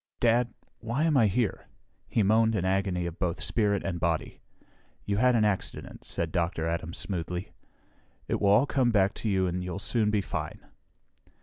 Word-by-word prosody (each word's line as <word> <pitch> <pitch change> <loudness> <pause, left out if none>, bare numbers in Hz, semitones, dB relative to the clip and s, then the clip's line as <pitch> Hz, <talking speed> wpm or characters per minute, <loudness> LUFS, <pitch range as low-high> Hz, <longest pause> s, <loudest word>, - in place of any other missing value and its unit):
"Dad 120 0 +3 0.3
why 115 +6 -1
am 160 -2 +2
I 115 -5 +5
here?" 105 +2 -1 0.4
He 110 - +1
moaned 110 +2 +3
in 95 -3 0
agony 95 -2 0
of 85 -1 -6
both 85 -3 -1
spirit 100 +5 +1
and 85 -3 -3
body. 85 -1 -2 0.6
"You 100 0 0
had 125 +2 +4
an 110 -2 +3
accident," 100 -3 -3
said 80 -1 -2
Dr. 85 -1 -1
Adams 85 0 -3
smoothly. 90 -1 -3 0.8
"It - - -1
will 100 - +4
all 105 +7 +5
come 130 -4 +2
back 100 -3 +3
to 110 - -3
you 95 -2 +2
and 90 0 -2
you'll 90 +1 -4
soon 105 +1 +1
be 105 -1 +2
fine." - - -5
100 Hz, 180 wpm, -28 LUFS, 90-115 Hz, 0.8 s, I